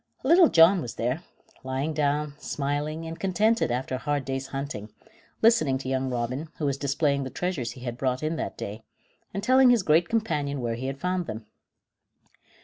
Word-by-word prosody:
Little 335 Hz, +5 st, +6 dB
John 170 Hz, +3 st, +6 dB
was 120 Hz, -, -6 dB
there, 125 Hz, +7 st, -1 dB, 0.4 s
lying 135 Hz, +4 st, -2 dB
down, 150 Hz, 0 st, 0 dB
smiling 150 Hz, +3 st, -3 dB
and 165 Hz, +1 st, -7 dB
contented 210 Hz, -, +2 dB
after 125 Hz, +2 st, -2 dB
a -, -, 0 dB
hard 145 Hz, -2 st, -1 dB
day's 135 Hz, 0 st, -3 dB
hunting, 135 Hz, -7 st, -5 dB, 0.5 s
listening 220 Hz, -, +4 dB
to 130 Hz, 0 st, -6 dB
young 130 Hz, 0 st, 0 dB
Robin, 125 Hz, +5 st, -3 dB
who 150 Hz, -, -2 dB
was 140 Hz, -1 st, -1 dB
displaying 140 Hz, 0 st, +1 dB
the 130 Hz, -, -4 dB
treasures 150 Hz, -8 st, -3 dB
he 130 Hz, -, -13 dB
had 120 Hz, -1 st, -5 dB
brought 130 Hz, +1 st, -1 dB
in 155 Hz, +2 st, -1 dB
that -, -, -4 dB
day, 105 Hz, +3 st, -6 dB, 0.5 s
and 200 Hz, -, -4 dB
telling 255 Hz, +2 st, +6 dB
his 240 Hz, -5 st, +4 dB
great 165 Hz, +1 st, +3 dB
companion 150 Hz, -11 st, -1 dB
where 120 Hz, -2 st, -2 dB
he 125 Hz, +3 st, -4 dB
had 135 Hz, 0 st, -4 dB
found 180 Hz, 0 st, -1 dB
them. 110 Hz, 0 st, -6 dB
145 Hz, 185 wpm, -26 LUFS, 130-170 Hz, 0.5 s, Little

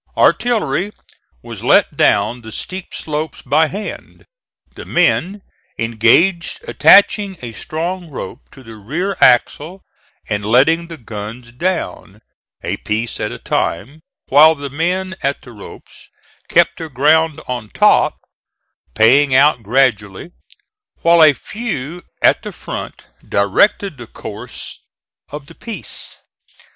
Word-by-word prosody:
Artillery 210 Hz, -, +1 dB, 0.5 s
was -, -, -9 dB
let -, -, +3 dB
down 120 Hz, +1 st, +2 dB
the 110 Hz, -1 st, -11 dB
steep 185 Hz, -, -7 dB
slopes 155 Hz, 0 st, -5 dB
by 155 Hz, +2 st, +2 dB
hand, 205 Hz, +6 st, -8 dB, 0.5 s
the -, -, -9 dB
men 195 Hz, +3 st, 0 dB, 0.3 s
engaged 120 Hz, -, +2 dB
attaching 200 Hz, -1 st, +4 dB
a 120 Hz, -, -5 dB
strong 170 Hz, +7 st, -5 dB
rope 130 Hz, -3 st, -8 dB
to 135 Hz, -, -16 dB
the 115 Hz, -2 st, -12 dB
rear 165 Hz, -, -3 dB
axle 150 Hz, +9 st, +2 dB, 0.4 s
and 105 Hz, -1 st, -2 dB
letting 140 Hz, +10 st, +3 dB
the 165 Hz, -1 st, -9 dB
guns 115 Hz, 0 st, -8 dB
down, 125 Hz, -, -4 dB, 0.4 s
a -, -, -3 dB
piece 110 Hz, +2 st, -3 dB
at 105 Hz, -, -3 dB
a -, -, -7 dB
time, 130 Hz, -, -3 dB, 0.3 s
while 155 Hz, +3 st, +7 dB
the 140 Hz, -2 st, -7 dB
men 180 Hz, +5 st, -2 dB
at 140 Hz, +1 st, -2 dB
the 125 Hz, -, -13 dB
ropes 105 Hz, -4 st, -14 dB, 0.4 s
kept -, -, +2 dB
their 160 Hz, -, -6 dB
ground 150 Hz, +4 st, +2 dB
on 120 Hz, -4 st, -5 dB
top, -, -, +3 dB, 0.8 s
paying 130 Hz, +5 st, +4 dB
out 140 Hz, -2 st, +4 dB
gradually, 110 Hz, -, 0 dB, 0.7 s
while 170 Hz, 0 st, +5 dB
a 155 Hz, -2 st, +7 dB
few 175 Hz, -, -6 dB, 0.2 s
at -, -, +4 dB
the -, -, -7 dB
front -, -, -8 dB, 0.3 s
directed 140 Hz, -, +1 dB
the 120 Hz, -, -9 dB
course 110 Hz, +4 st, -9 dB, 0.5 s
of 150 Hz, -1 st, -8 dB
the -, -, -15 dB
piece. 230 Hz, -3 st, -6 dB
145 Hz, 125 wpm, -17 LUFS, 120-175 Hz, 0.8 s, while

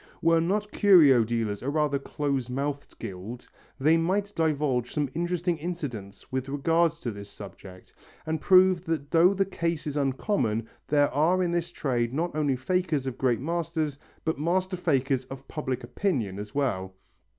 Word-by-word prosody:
Were 165 Hz, 0 st, +4 dB
not 205 Hz, +5 st, -1 dB
curio 155 Hz, -, +6 dB
dealers 110 Hz, -3 st, -2 dB
a 135 Hz, -, -2 dB
rather 145 Hz, -1 st, +1 dB
close 140 Hz, -3 st, -2 dB
mouthed 140 Hz, +2 st, -4 dB
guild, 110 Hz, +3 st, -7 dB, 0.3 s
they 155 Hz, +4 st, +4 dB
might 195 Hz, +5 st, 0 dB
divulge 145 Hz, -6 st, 0 dB
some 145 Hz, -3 st, 0 dB
interesting 175 Hz, 0 st, -1 dB
incidents 140 Hz, -, -6 dB
with 130 Hz, +1 st, -2 dB
regard 165 Hz, +4 st, +2 dB
to 160 Hz, -8 st, -5 dB
this 100 Hz, -1 st, -9 dB
subject, 95 Hz, -2 st, -12 dB, 0.3 s
and 160 Hz, -1 st, -2 dB
prove 185 Hz, -2 st, +5 dB
that 155 Hz, -3 st, -3 dB
though 175 Hz, +4 st, +5 dB
the 195 Hz, 0 st, +2 dB
case 170 Hz, -4 st, -2 dB
is 150 Hz, -1 st, -3 dB
uncommon 135 Hz, -, 0 dB, 0.2 s
there 145 Hz, -1 st, +3 dB
are 175 Hz, +5 st, +3 dB
in 175 Hz, -, 0 dB
this 170 Hz, 0 st, -1 dB
trade 125 Hz, -6 st, -1 dB
not 170 Hz, +1 st, -1 dB
only 145 Hz, -3 st, +1 dB
fakers 155 Hz, +1 st, 0 dB
of 130 Hz, -2 st, -5 dB
great 125 Hz, -3 st, +1 dB
masters 160 Hz, -2 st, -2 dB, 0.3 s
but 160 Hz, -3 st, -1 dB
master 185 Hz, +4 st, 0 dB
fakers 135 Hz, -6 st, 0 dB
of 135 Hz, +1 st, -10 dB
public 130 Hz, -5 st, -3 dB
opinion 120 Hz, -, -2 dB
as 105 Hz, +3 st, -8 dB
well. 95 Hz, -10 st, -1 dB
145 Hz, 160 wpm, -27 LUFS, 125-170 Hz, 0.3 s, curio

